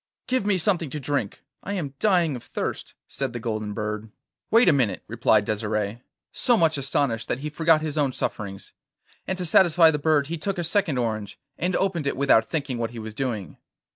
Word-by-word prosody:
'Give 255 -5 0
me 200 -2 +3
something 175 -4 +1
to 150 - -5
drink, 135 -6 -3 0.2
I 200 - -5
am 155 -9 -3
dying 175 -8 +3
of 120 - -7
thirst,' - - -5
said 135 -3 -4
the 120 - -4
golden 110 -2 -3
bird. 105 +1 -4 0.4
'Wait 230 0 +5
a 170 - +7
minute,' 125 -7 0
replied 110 -2 +2
Desire, 105 +1 -2 0.3
so 240 -2 +3
much 165 -4 +3
astonished 130 -4 -1
that 130 - -2
he 150 +1 -4
forgot 160 0 +3
his 155 -1 -2
own 140 -3 +2
sufferings; 100 -5 -5 0.5
and 190 - -2
to 180 - -3
satisfy 165 -1 +5
the 150 - -2
bird 145 -1 +2
he 165 +2 -5
took 195 +4 -2
a 175 - -1
second 170 -4 +1
orange, 110 -4 -2 0.2
and 180 +1 -1
opened 175 -7 0
it - - -1
without 135 -5 +4
thinking 140 -6 -2
what 115 -1 -1
he 120 - -10
was 110 -1 -6
doing. 110 -6 -4
140 Hz, 200 wpm, -25 LUFS, 115-170 Hz, 0.5 s, a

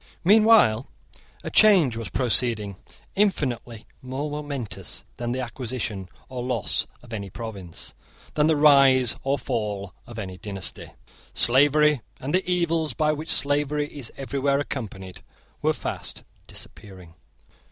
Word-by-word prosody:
Meanwhile 205 - +5 0.6
a - - -5
change 185 - +6
was 115 -1 -5
proceeding 115 -5 +1 0.4
infinitely 130 - -1 0.2
more 135 +4 -4
momentous 145 -7 -5
than 120 0 -3
the 130 +1 -2
acquisition 120 -6 -4 0.2
or 130 -1 -5
loss 125 -3 -1 0.2
of 120 -2 -11
any 100 -3 -4
province, 100 -5 -8 0.4
than 150 0 +3
the 160 - +4
rise 135 -5 +6
or 135 +1 0
fall 105 -7 -3
of 120 - -10
any 95 -4 -6
dynasty. 100 -3 -4 0.5
Slavery 145 +2 +4 0.2
and 135 +3 -4
the 185 +1 +3
evils 165 -6 +1
by 155 -1 +2
which 155 +1 -5
slavery 145 +1 +1
is 135 -6 -4
everywhere 140 +1 0
accompanied 100 -10 -5 0.4
were - - +3
fast - - -5 0.2
disappearing. 95 -5 -8
130 Hz, 125 wpm, -25 LUFS, 110-150 Hz, 0.6 s, change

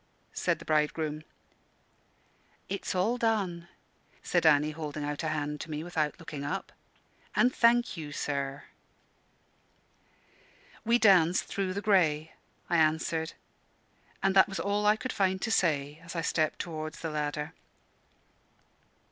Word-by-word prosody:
said - - 0
the - - -12
bridegroom. 155 0 0 1.5
"It's 195 -1 -3
all 225 +7 +1
done," 195 -7 0 0.6
said 175 -2 +2
Annie, 150 0 +4
holding 150 -1 -5
out 145 0 -3
a 160 - -2
hand 150 -1 -2
to - - -7
me, 155 0 -4
without 160 -3 -1
looking 155 -4 -7
up. 190 +7 -4 0.6
"And 250 +1 +4
thank 240 +1 +3
you, 150 -2 -6
sir." 140 -1 -3 2.2
"We 235 +1 +4
danced 185 -6 +5
through 190 -2 -2
the 200 - -3
grey," 160 -7 +2 0.3
I 170 - +2
answered; 160 0 +1 0.9
and 195 0 +2
that 190 - +6
was 195 - -4
all 205 +1 0
I 210 - +6
could 255 +4 -5
find 190 -1 +1
to 225 - -1
say, 150 -6 +1
as 165 +1 -9
I 165 - 0
stepped 155 -1 0
towards 155 -2 -5
the 165 - -3
ladder. 150 0 -3
160 Hz, 135 wpm, -29 LUFS, 150-195 Hz, 2.2 s, that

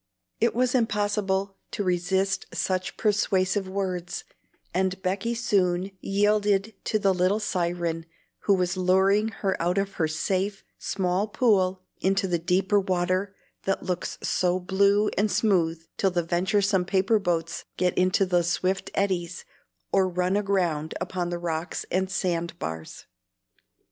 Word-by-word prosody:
It 235 -1 +2
was 250 +1 +2
impossible 205 -4 0 0.2
to 205 - -1
resist 190 +1 0
such 185 -1 -1
persuasive 195 -2 +1
words, 185 -2 -3 0.5
and 190 +1 0
Becky 195 +6 -1
soon 195 -5 +1
yielded 205 +1 +1
to 215 - +1
the 195 -2 +2
little 185 +3 +2
siren 170 -4 -2 0.4
who 200 - +5
was 180 -1 0
luring 190 +3 +3
her 200 -3 -1
out 175 +3 +1
of 195 0 0
her 160 - +3
safe, 190 +5 -1 0.2
small 190 +1 0
pool 190 -5 +2 0.2
into 195 +1 +1
the 175 -2 0
deeper 190 +4 +2
water 185 +1 0 0.3
that 195 - 0
looks 180 -2 -3
so 180 0 +1
blue 200 +3 +3
and 210 +1 +2
smooth 170 -7 +1
till 195 - +2
the 175 -2 0
venturesome 190 +3 +1
paper 195 +4 +2
boats 170 -4 -2
get 180 0 +1
into 185 +2 +3
the 180 -1 +2
swift 185 +3 -1
eddies, 185 -3 -1 0.5
or 190 -1 +3
run 180 +1 0
aground 180 -7 0
upon 180 -2 -2
the 175 - -2
rocks 170 0 -3
and 190 +1 +1
sandbars. 165 - -3
190 Hz, 135 wpm, -26 LUFS, 180-200 Hz, 0.5 s, who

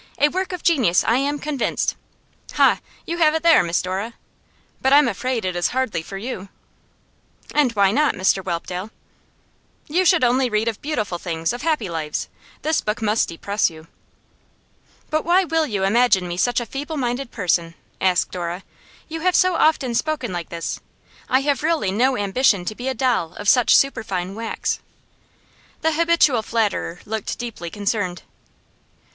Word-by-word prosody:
A 295 - +4
work 375 +4 -2
of 360 -2 -6
genius, 255 - +3
I 230 - +2
am 285 +2 0
convinced. 290 -3 -1 0.6
Ha! - - +4 0.3
you 340 +1 -4
have 310 -1 +4
it 320 - -1
there, 335 -8 +6
Miss 170 0 0
Dora. 195 +5 -4 0.7
But 265 +1 +3
I'm 290 -2 +6
afraid 245 -3 -2
it 185 -1 -2
is 175 -1 +1
hardly 255 -9 -1
for 195 +4 -8
you.' 200 -3 -6 1.0
'And 290 -5 +3
why 200 -2 +3
not, 295 +6 +2
Mr 190 0 +1
Whelpdale?' 180 +2 -4 1.0
'You 350 +5 +2
should 350 -4 +4
only 250 +1 +3
read 215 0 0
of 225 -2 -2
beautiful 215 - -2
things, 165 +1 -2
of 245 - -6
happy 305 -9 0
lives. 160 -3 -4 0.3
This 315 +1 +1
book 210 +1 -2
must 220 0 +1
depress 200 +6 0
you.' 160 -1 -13 1.3
'But 310 0 +1
why 360 +3 +4
will 325 -2 0
you 205 -6 -2
imagine 205 -2 +3
me 175 - -4
such 245 +7 +1
a 240 - -4
feeble 290 +5 -5
minded 250 0 -2
person?' 170 -6 -1 0.3
asked 185 -2 +2
Dora. 175 +1 -4 0.4
'You 325 +1 -5
have 360 +2 +1
so 370 0 +4
often 305 -6 +2
spoken 255 -4 -1
like 175 -2 -5
this. 170 -1 -4 0.5
I 260 +1 +3
have 280 -2 0
really 310 - +1
no 255 +6 +2
ambition 205 -1 +2
to 215 - -3
be 245 +4 -6
a 265 - -1
doll 235 -10 0
of 205 - -6
such 245 +2 +5
superfine 195 -9 -1
wax.' 225 +2 -3 1.0
The 320 - +2
habitual 325 -6 +3
flatterer 210 -6 -1
looked 220 -1 -4
deeply 230 -8 -6
concerned. 200 -2 -2
230 Hz, 165 wpm, -21 LUFS, 190-290 Hz, 1.3 s, there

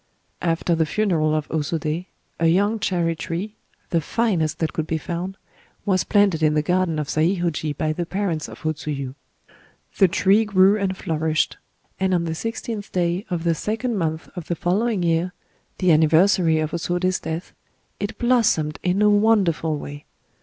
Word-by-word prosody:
After 170 0 0
the 160 -1 +1
funeral 160 -6 +1
of 155 -1 -1
O 160 - 0
Sodé, 155 +3 -2 0.3
a 165 - +3
young 205 +6 +2
cherry 170 -4 0
tree,—the 170 -1 -5
finest 165 -6 0
that 160 -1 -2
could 160 -1 -2
be 160 - 0
found,—was 185 +2 -4
planted 200 -6 +3
in 155 -1 +3
the 150 - +2
garden 180 -1 +1
of 150 -2 -2
Saihōji 160 -2 0
by 155 0 0
the 170 +1 -3
parents 180 -5 -2
of - - -12
O 155 - +1
Tsuyu. 145 -4 -5 0.9
The 190 - +7
tree 195 +5 +3
grew 195 -1 +4
and 195 -3 -1
flourished; 160 -3 0 0.4
and 190 -1 +2
on 170 - +1
the 165 -1 -2
sixteenth 225 +3 -5
day 175 +2 -1
of 175 -3 -2
the 170 -1 +2
second 225 +8 -2
month 160 -3 -2
of 175 -3 -7
the 170 - -1
following 195 +4 0
year,—the 175 +2 -2
anniversary 160 +2 +4
of 155 0 -2
O - - 0
Sodé's 180 +2 0
death,—it 195 +5 -7
blossomed 225 -12 +2
in 185 +3 +1
a 210 - +6
wonderful 200 -7 +2
way. 145 0 -8
170 Hz, 160 wpm, -22 LUFS, 160-195 Hz, 0.9 s, The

